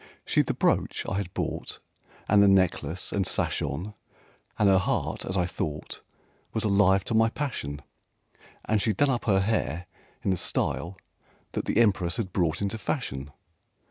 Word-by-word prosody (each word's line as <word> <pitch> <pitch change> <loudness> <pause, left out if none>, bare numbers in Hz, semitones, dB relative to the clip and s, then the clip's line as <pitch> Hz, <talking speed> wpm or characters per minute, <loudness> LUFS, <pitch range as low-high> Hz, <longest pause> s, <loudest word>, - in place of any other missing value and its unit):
She'd - - +2
the - - -1
brooch - - +1
I 95 - -1
had 100 -3 -3
bought - - -3 0.5
And 105 0 +5
the 100 - +6
necklace 95 -3 +2
and 100 -2 0
sash - - 0
on, 105 +5 -3 0.6
And 105 - +4
her 95 -1 +6
heart, - - -1
as 95 - -2
I 90 - +2
thought, 75 -3 -5 0.5
Was 110 - 0
alive 100 -2 +4
to 115 - -3
my 115 0 +4
passion; 75 - -4 0.8
And 110 -1 +1
she'd 105 -3 0
done 145 -1 +3
up 120 - -2
her 95 -3 +3
hair 90 -6 -1 0.4
in 95 - +1
the 95 - +1
style 85 +2 -1 0.5
that - - -3
the - - -1
Empress 100 -5 +3
had 95 -6 -3
brought 85 0 +1
into 100 +3 -2
fashion. 75 - -3
95 Hz, 170 wpm, -27 LUFS, 90-105 Hz, 0.8 s, the